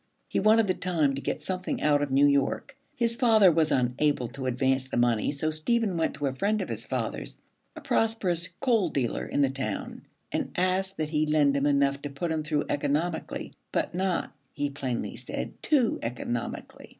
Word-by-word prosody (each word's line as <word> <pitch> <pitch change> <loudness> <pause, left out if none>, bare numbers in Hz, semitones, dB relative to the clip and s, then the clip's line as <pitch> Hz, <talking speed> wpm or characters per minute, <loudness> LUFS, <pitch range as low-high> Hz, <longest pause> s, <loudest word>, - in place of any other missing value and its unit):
He - - 0
wanted 220 +2 +5
the 185 - +1
time 165 -7 +1
to 135 - -4
get - - -3
something 185 -1 -3
out 145 -1 +3
of 145 - -1
New 135 +2 +4
York. 140 - +1 0.2
His 230 -1 +1
father 220 -7 +6
was 160 -1 +2
unable 125 +1 +1
to 135 -1 -5
advance 130 +1 +1
the - - -3
money, 120 -1 +2
so 155 +2 -1
Stephen 200 +6 0
went 165 -1 0
to 145 - -3
a 135 - 0
friend 205 +10 0
of - - -8
his 115 0 -4
father's, 110 - -4 0.4
a - - -8
prosperous 185 -6 0
coal 230 -9 +3
dealer 130 -6 -1
in 145 - +1
the 135 - +2
town, 130 -7 -5 0.2
and - - -2
asked 185 +1 0
that 155 -1 -2
he 155 0 +1
lend 150 -2 +3
him 140 +1 +2
enough 140 -1 +2
to 145 - -5
put 150 +5 -3
him 160 -1 0
through 150 -1 -1
economically, 155 +4 -2 0.2
but 160 - -1
not, 185 0 -1 0.2
he 145 0 -2
plainly 130 -4 -3
said, - - -6
too 260 -7 +2
economically. 120 0 -5
150 Hz, 190 wpm, -27 LUFS, 135-185 Hz, 0.4 s, father